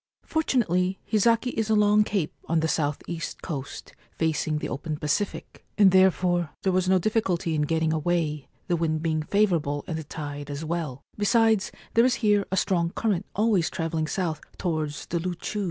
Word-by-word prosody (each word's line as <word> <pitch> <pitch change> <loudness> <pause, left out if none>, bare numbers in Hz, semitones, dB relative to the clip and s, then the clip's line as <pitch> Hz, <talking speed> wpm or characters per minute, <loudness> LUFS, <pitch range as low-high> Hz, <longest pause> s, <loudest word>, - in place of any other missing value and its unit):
Fortunately, 195 - +1
Hizaki 230 +3 +2
is 220 -2 -2
a 220 - +4
long 210 0 +5
cape 195 -7 -2
on 165 -1 +1
the 150 -2 0
S.E. 170 -1 -4 0.2
coast, 140 -6 -6 0.2
facing 155 -1 0
the - - -3
open 150 +2 -4
Pacific, 150 +8 -3
and 200 -3 +7
therefore 180 -2 +3
there 190 - +2
was 185 0 +1
no 190 - +5
difficulty 185 -4 0
in 155 - +1
getting 160 +1 +1
away, 155 -2 -1 0.2
the 175 - +2
wind 160 -1 -1
being 160 -2 0
favourable 160 -6 +1
and 160 -2 -3
the - - -5
tide 145 -1 -6
as 145 +2 -5
well; 155 -5 -3 0.2
besides, 220 -1 +3 0.2
there 230 - +5
is 255 +1 +3
here 205 -1 +3
a 190 - 0
strong 175 -4 +1
current 200 0 -1
always 205 -5 +2
travelling 160 -1 -2
south 160 -3 -2 0.2
towards 155 -4 -2
the 170 - -2
Loochoos. 180 +4 -4
175 Hz, 170 wpm, -26 LUFS, 155-205 Hz, 0.2 s, and